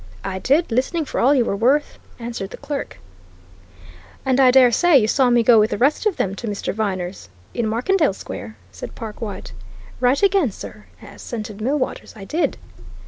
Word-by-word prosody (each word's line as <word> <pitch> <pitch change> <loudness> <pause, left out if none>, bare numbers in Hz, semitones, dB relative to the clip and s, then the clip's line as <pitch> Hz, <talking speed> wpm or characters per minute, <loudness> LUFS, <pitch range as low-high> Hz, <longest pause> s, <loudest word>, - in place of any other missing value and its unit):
"I 190 -1 -4
did 285 - +1
listening 285 +7 0
for - - -4
all 275 +4 +4
you 245 -4 +3
were 200 - -1
worth," 260 +8 +1 0.2
answered 230 -5 -5
the - - -9
clerk. 285 -1 -5 1.3
"And 260 0 +2
I 260 -2 +7
dare 250 -1 +6
say 350 +4 +5
you 215 -5 +3
saw 255 +2 +3
me 240 -1 +4
go 230 -1 +6
with 215 +1 +3
the - - -2
rest 285 - +2
of 405 - -1
them 195 - -1
to 235 - -6
Mr. 205 -1 -3
Viner's, 185 - -4 0.2
in 235 -2 -1
Markendale 285 - +1
Square?" 110 - -8
said 90 - -9
Perkwite. 215 -2 -7 0.5
"Right 255 +7 +2
again, 390 -8 +3
sir," - - -10 0.2
assented 215 -3 -7
Millwaters. 265 +4 -2
"I 195 - -9
did." 320 - -1
240 Hz, 180 wpm, -21 LUFS, 210-280 Hz, 1.3 s, I